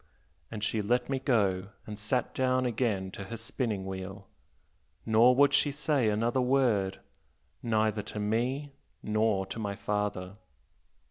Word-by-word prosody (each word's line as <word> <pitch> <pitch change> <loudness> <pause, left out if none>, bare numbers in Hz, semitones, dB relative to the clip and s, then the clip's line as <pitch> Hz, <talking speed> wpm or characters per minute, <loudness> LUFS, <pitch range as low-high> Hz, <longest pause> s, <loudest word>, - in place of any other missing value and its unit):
And 105 -2 -6
she 110 0 0
let 120 +4 0
me 135 - 0
go, 100 -8 +1 0.2
and 105 - -6
sat 110 +4 -1
down 130 0 +1
again 110 -6 -1
to 100 - -7
her 115 +5 -6
spinning 110 -3 -2
wheel, 95 +1 -6 0.8
nor 115 +3 +5
would 140 +2 +5
she 145 - +3
say 145 -5 +1
another 115 +4 +1
word 120 -7 +1 0.6
neither 110 -2 +1
to 105 +1 -7
me 125 +7 -1 0.3
nor 105 -2 +1
to 95 +4 -7
my 100 -2 -3
father." 100 -2 -3
110 Hz, 140 wpm, -30 LUFS, 100-125 Hz, 0.8 s, nor